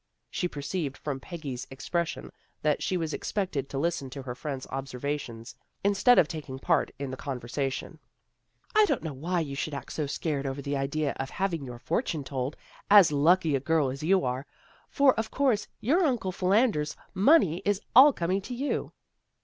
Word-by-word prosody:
She 180 Hz, -, -1 dB
perceived 145 Hz, -1 st, -4 dB
from 140 Hz, -3 st, -4 dB
Peggy's 140 Hz, -6 st, -6 dB
ex 135 Hz, -, -9 dB
pression 170 Hz, -1 st, -2 dB, 0.3 s
that 150 Hz, -1 st, +2 dB
she 185 Hz, -, 0 dB
was 160 Hz, -2 st, -2 dB
expected 175 Hz, -10 st, -2 dB
to 135 Hz, -, -4 dB
listen 145 Hz, -2 st, -1 dB
to 135 Hz, +1 st, -7 dB
her 125 Hz, -2 st, -5 dB
friend's 135 Hz, 0 st, -5 dB
observations, 135 Hz, -3 st, -4 dB, 0.3 s
instead 205 Hz, +5 st, +5 dB
of 160 Hz, -, +6 dB
taking 150 Hz, -5 st, -6 dB
part 165 Hz, +3 st, +1 dB
in 140 Hz, -2 st, -4 dB
the -, -, -4 dB
conversation. 135 Hz, +1 st, -4 dB, 0.4 s
" -, -, -35 dB
I 430 Hz, 0 st, +7 dB
don't 285 Hz, -9 st, -1 dB
know 160 Hz, -3 st, -4 dB
why 170 Hz, +6 st, -1 dB
you 145 Hz, -3 st, -4 dB
should 145 Hz, +2 st, -3 dB
act 140 Hz, -, -7 dB
so 150 Hz, -2 st, -2 dB
scared 140 Hz, -1 st, -2 dB
over 135 Hz, +1 st, -4 dB
the 140 Hz, +1 st, -2 dB
idea 140 Hz, +1 st, -1 dB
of 135 Hz, 0 st, -3 dB
having 180 Hz, -5 st, -2 dB
your 120 Hz, -2 st, -7 dB
fortune 160 Hz, -, -2 dB
told, 135 Hz, +1 st, -3 dB, 0.3 s
as 200 Hz, -6 st, +8 dB
lucky 160 Hz, +2 st, +3 dB
a -, -, +1 dB
girl 155 Hz, 0 st, +1 dB
as 135 Hz, +3 st, -7 dB
you 185 Hz, 0 st, +3 dB
are. 130 Hz, +2 st, -2 dB, 0.4 s
For 280 Hz, -2 st, +5 dB
of 220 Hz, -1 st, -2 dB
course 250 Hz, -7 st, +1 dB
your 320 Hz, -, +3 dB
Uncle 245 Hz, -, 0 dB
Philander's 185 Hz, -4 st, +1 dB, 0.2 s
money 195 Hz, -, +4 dB
is 205 Hz, -1 st, +1 dB, 0.2 s
all 275 Hz, +4 st, +10 dB
coming 185 Hz, -3 st, -1 dB
to 245 Hz, +6 st, -6 dB
you." 275 Hz, +4 st, -2 dB
155 Hz, 185 wpm, -28 LUFS, 135-190 Hz, 0.4 s, all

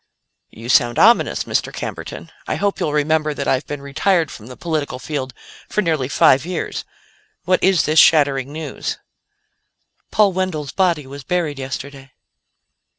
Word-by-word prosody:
"You 115 Hz, +2 st, -11 dB
sound 120 Hz, -1 st, +3 dB
ominous, 230 Hz, +3 st, +4 dB
Mr. -, -, -1 dB
Camberton. -, -, -7 dB, 0.2 s
I -, -, -1 dB
hope 200 Hz, -1 st, -1 dB
you'll 150 Hz, -, -1 dB
remember 150 Hz, 0 st, +1 dB
that 140 Hz, -, -3 dB
I've 130 Hz, +2 st, 0 dB
been 145 Hz, -1 st, -6 dB
retired 160 Hz, +3 st, +1 dB
from 110 Hz, -, -11 dB
the 125 Hz, -, -10 dB
political 155 Hz, -6 st, -3 dB
field 130 Hz, 0 st, -4 dB, 0.4 s
for 210 Hz, -, 0 dB
nearly 155 Hz, -7 st, 0 dB
five 135 Hz, -1 st, +4 dB
years. 175 Hz, 0 st, -4 dB, 0.6 s
What 185 Hz, +1 st, +2 dB
is 190 Hz, -3 st, +4 dB
this 155 Hz, +1 st, +3 dB
shattering 140 Hz, -3 st, +4 dB
news?" 155 Hz, -2 st, -5 dB, 1.1 s
"Paul 205 Hz, -2 st, +3 dB
Wendell's 175 Hz, -6 st, -2 dB
body 175 Hz, -6 st, +1 dB
was 140 Hz, +1 st, -9 dB
buried 165 Hz, -3 st, -1 dB
yesterday." 135 Hz, 0 st, -7 dB
150 Hz, 150 wpm, -20 LUFS, 135-175 Hz, 1.1 s, ominous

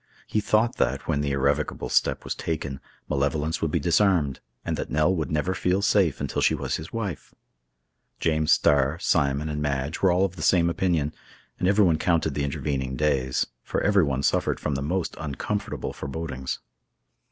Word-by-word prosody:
He 110 Hz, -, 0 dB
thought 110 Hz, +3 st, +2 dB
that, 70 Hz, +1 st, 0 dB
when 75 Hz, -3 st, +1 dB
the 70 Hz, -, -1 dB
irrevocable 70 Hz, +2 st, 0 dB
step -, -, +1 dB
was -, -, -3 dB
taken, 75 Hz, -4 st, -4 dB, 0.3 s
malevolence 75 Hz, +3 st, 0 dB
would 80 Hz, -, +1 dB
be 85 Hz, -, 0 dB
disarmed, 85 Hz, -3 st, +2 dB, 0.3 s
and -, -, -1 dB
that -, -, -4 dB
Nell 80 Hz, +5 st, +2 dB
would 80 Hz, -3 st, -2 dB
never 80 Hz, +4 st, 0 dB
feel 95 Hz, +1 st, 0 dB
safe 95 Hz, -7 st, +3 dB
until -, -, -2 dB
she -, -, +3 dB
was -, -, -2 dB
his 80 Hz, -, -8 dB
wife. 100 Hz, -, -5 dB, 0.8 s
James 80 Hz, -1 st, +1 dB
Starr, 70 Hz, +2 st, +3 dB
Simon, 70 Hz, -4 st, +1 dB
and 75 Hz, -1 st, -3 dB
Madge, 75 Hz, +1 st, -2 dB
were 95 Hz, -, +5 dB
all 90 Hz, +2 st, +3 dB
of 95 Hz, -1 st, -5 dB
the -, -, -6 dB
same 85 Hz, +1 st, +3 dB
opinion, 85 Hz, -4 st, 0 dB, 0.5 s
and 90 Hz, -, +1 dB
everyone 95 Hz, -5 st, +4 dB
counted 80 Hz, -3 st, +1 dB
the 70 Hz, -, -1 dB
intervening 70 Hz, -2 st, -2 dB
days, 65 Hz, -3 st, +1 dB, 0.2 s
for -, -, -2 dB
everyone 80 Hz, -10 st, +2 dB
suffered -, -, +1 dB
from 75 Hz, -, -2 dB
the 70 Hz, -, -2 dB
most 85 Hz, +5 st, -2 dB
uncomfortable 80 Hz, +7 st, -3 dB
forebodings. 70 Hz, -3 st, -4 dB
80 Hz, 175 wpm, -25 LUFS, 70-90 Hz, 0.8 s, were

